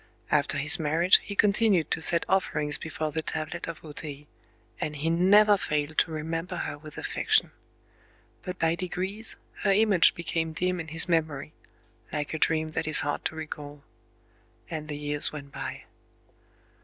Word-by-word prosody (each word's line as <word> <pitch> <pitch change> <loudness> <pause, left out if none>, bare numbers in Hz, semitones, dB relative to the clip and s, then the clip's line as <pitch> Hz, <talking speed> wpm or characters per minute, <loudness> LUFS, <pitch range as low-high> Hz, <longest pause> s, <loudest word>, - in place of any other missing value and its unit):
After - - +2
his 150 +3 +3
marriage 165 +4 +5
he 200 - -8
continued 200 -5 +3
to - - +1
set 165 +1 +1
offerings 150 -6 0
before 155 -1 -4
the 160 +2 -2
tablet 155 -1 -4
of 165 -1 -8
O 155 - -8
Tei; 145 -1 -7 0.5
and 150 - -3
he 155 +3 -1
never 205 +4 +5
failed 150 -3 -2
to - - +2
remember 165 +3 -4
her - - -4
with 150 +1 -13
affection. 435 0 +1 0.9
But 180 0 -6
by 165 0 +2
degrees 185 +5 -2 0.3
her 200 - +2
image 200 -4 +4
became 165 -1 -2
dim 180 +2 -1
in 165 - -5
his 165 +1 +2
memory,—like 150 -2 -4
a 160 - -3
dream 160 0 +1
that 155 0 -3
is 155 - +7
hard 145 0 -2
to - - -1
recall. 150 -2 -8 0.9
And 155 -2 -5
the 150 -1 -5
years 145 0 0
went 140 -2 -9
by. - - -6
160 Hz, 160 wpm, -27 LUFS, 150-180 Hz, 0.9 s, is